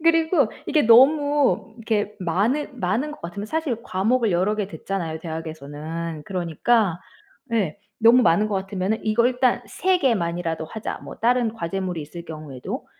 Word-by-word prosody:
그리고 325 - +3 0.2
이게 305 - +3
너무 280 0 +4
이렇게 215 -2 -1
많은 230 - 0
많은 220 +11 0
것 - - -12
같으면 190 +5 -6
사실 310 -1 -1
과목을 225 +3 +1
여러 185 +5 +2
개 210 -2 -2
듣잖아요. 165 -2 -4
대학에서는. 160 0 -6
그러니까 180 +2 +1 0.5
예 195 -9 0 0.2
너무 235 +3 +6
많은 175 +4 +4
것 210 - -2
같으면은 195 +2 -1
'이거 220 +2 +3
일단 250 -1 +1
3 370 +1 +1
개만이라도 170 - 0
하자.' 220 +6 -5
뭐 - - -9
다른 240 -1 +2
과제물이 185 -3 -3
있을 170 +3 -9
경우에도 150 -6 -7
205 Hz, 335 characters per minute, -23 LUFS, 170-245 Hz, 0.5 s, 너무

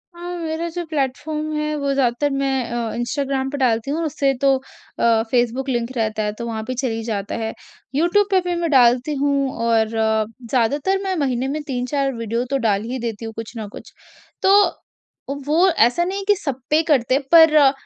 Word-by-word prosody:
हाँ, 350 +1 -6
मेरा 330 0 -3
जो 350 +1 -4
प्लेटफॉर्म 305 +1 -2
है 300 0 -1
वो 280 -1 0
ज़्यादातर 270 +2 +1
मैं 275 0 0 0.2
अ, 235 -2 -2
इंस्टाग्राम 265 +2 -2
पे 285 - -4
डालती 245 0 +1
हूँ 330 +2 -1
उससे 280 -2 +1
तो 275 -1 +4 0.4
अ, 225 -1 +3
फेसबुक 250 +2 0
लिंक 240 0 -1
रहता 215 -1 -1
है। 210 0 -2
तो 235 - -3
वहाँ 220 -1 -4
पे 255 - -2
चल 255 0 -1
ही 225 0 -4
जाता 205 -3 -3
है, 225 -1 -3 0.4
यूट्यूब 355 +6 +3
पे 380 - +5
भी 350 - 0
मैं 335 - 0
डालती 250 +2 +4
हूँ 280 -1 +1 0.2
और 225 -1 +3
ज़्यादातर 230 - 0
मैं 380 -1 -1
महीने 260 -2 0
में 300 +3 -3
3-4 270 +1 -1
वीडियो 230 +1 -2
तो 275 - +1
डाल 200 0 +1
ही 260 - -3
देती 230 -1 -4
हूँ 225 - -6
कुछ 225 +1 -7
न 215 -2 -5
कुछ। - - -12 0.5
तो 385 - +5 0.9
वो 330 +6 +3
ऐसा 285 -1 +3
नहीं 375 +3 -3
है 395 - -5
कि 415 - +5
सब 280 -8 -4
पे 300 - +3
ही 325 - +2
करते, 265 -4 +2
पर 310 -4 +7
265 Hz, 200 wpm, -21 LUFS, 230-305 Hz, 0.9 s, पर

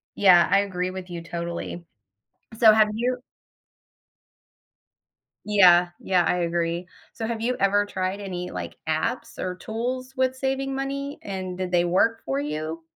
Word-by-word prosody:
Yeah, 180 -4 +6
I 195 +1 +5
agree 185 -2 -2
with 185 -1 -8
you 170 -1 -6
totally. 170 0 -5 0.8
So 220 -2 +8
have 215 -1 +5
you 245 +3 0 2.3
Yeah, 180 -4 +6
yeah, 180 -2 +2
I 180 - +1
agree, 170 0 -1 0.3
so 225 - -4
have 230 -1 -3
you 245 +2 0
ever 205 +1 +3
tried 190 0 -3
any 180 -3 -5
like 85 -2 -6
apps 160 +10 -2
or 185 0 -3
tools 250 +6 -4
with 260 -1 0
saving 270 +1 -2
money, 275 +1 -4
and 185 -2 -5
did 185 -1 -3
they 175 -1 +3
work 225 +6 +2
for 135 +1 -1
you? 155 +3 -4
190 Hz, 150 wpm, -25 LUFS, 175-230 Hz, 2.3 s, So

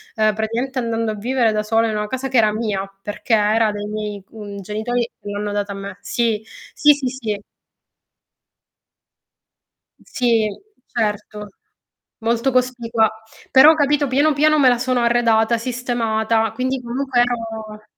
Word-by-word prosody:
ehm, 215 -1 +2
praticamente 235 +5 -2
andando 230 -2 -1
a - - -5
vivere 235 +1 +1
da 215 0 -1
sola 225 +1 +2
in 215 - -2
una 210 - -1
casa 260 +3 -3
che 260 -1 0
era 215 -2 +4
mia, 210 -3 -2
perché 210 +3 -3
era 215 +1 +3
dei 205 0 -5
miei 210 -2 -5
mhmm, 205 -2 -8
genitori 230 +4 -2
che - - -13
l'hanno 205 0 -3
data 205 0 -2
a - - -5
me. 200 -1 -7
Sì. 225 -3 -1 0.3
Sì, 295 - +5
sì, 275 -3 -3
sì. 225 -5 -4 2.6
Sì. 230 -4 +1 0.4
Certo. 210 -2 -3 0.7
Molto 235 +3 0
cospicua, 240 -3 +1 0.4
però 295 +4 +8
capito 290 -1 +2
piano 285 +4 +3
piano 305 +2 +3
me 260 -2 +6
la 245 -1 +2
sono 255 -1 0
arredata, 235 -1 +3
sistemata, 230 -2 0
quindi 260 0 -2
comunque 250 +1 -1
ero 225 -3 -3
230 Hz, 145 wpm, -20 LUFS, 215-250 Hz, 2.6 s, però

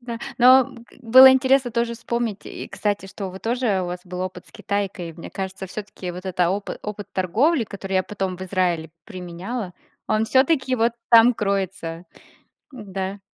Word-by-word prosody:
Да. 235 -1 -6 0.2
Но 260 +2 +6 0.3
было 260 +2 +9
интересно 265 -1 +3
тоже 235 0 -1
вспомнить. 230 -2 -3
И, - - -7
кстати, 205 -2 -2
что 195 -1 -6
вы 190 - -9
тоже 225 -4 0
у - - -3
вас 180 0 -5
был 180 0 -6
опыт 185 -1 -5
с - - -14
Китайкой. 195 -4 -3
Мне 165 - -10
кажется, 190 0 -5
всё-таки 190 -2 -7
вот 180 +2 -8
этот 185 -1 -4
опы 200 +2 -3
опыт 210 -1 -7
торговли, 230 - +2
который 195 -2 -6
я 185 - +3
потом 190 -1 -4
в 185 - -8
Израиле 180 -4 -1
применяла, 185 +3 -6 0.4
он 215 +1 +2
всё-таки 260 +1 +2
вот 230 0 +2 0.2
там 235 +1 +7
кроется. 190 -5 -3 0.7
Да. 195 -4 -6
200 Hz, 165 wpm, -22 LUFS, 185-235 Hz, 0.7 s, было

